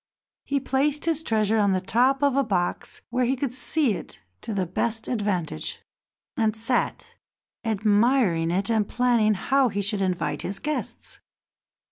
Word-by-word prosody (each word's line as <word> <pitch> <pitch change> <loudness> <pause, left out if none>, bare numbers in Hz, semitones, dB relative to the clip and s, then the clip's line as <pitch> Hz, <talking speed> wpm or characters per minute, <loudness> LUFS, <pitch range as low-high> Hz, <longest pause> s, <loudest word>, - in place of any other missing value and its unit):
He 280 0 0
placed 275 +3 0
his 325 -2 +1
treasure 220 -5 +1
on 200 -2 +3
the 185 - +1
top 255 +8 +2
of 280 -2 +3
a 275 - +3
box 180 -6 -2
where 250 +1 +1
he 260 +3 +1
could 260 -1 -3
see 265 0 +2
it - - -8 0.2
to - - -5
the 195 -3 0
best 225 +6 -2
advantage, 190 - -2 0.6
and 220 -1 +1
sat 235 +2 0 0.6
admiring 210 -4 +2
it 195 +5 0
and 215 -2 +1
planning 235 -4 +2
how 265 +6 +2
he 200 -1 -2
should 205 0 -1
invite 185 -2 -1
his 195 - -3
guests. 300 0 -4
225 Hz, 155 wpm, -25 LUFS, 200-265 Hz, 0.6 s, on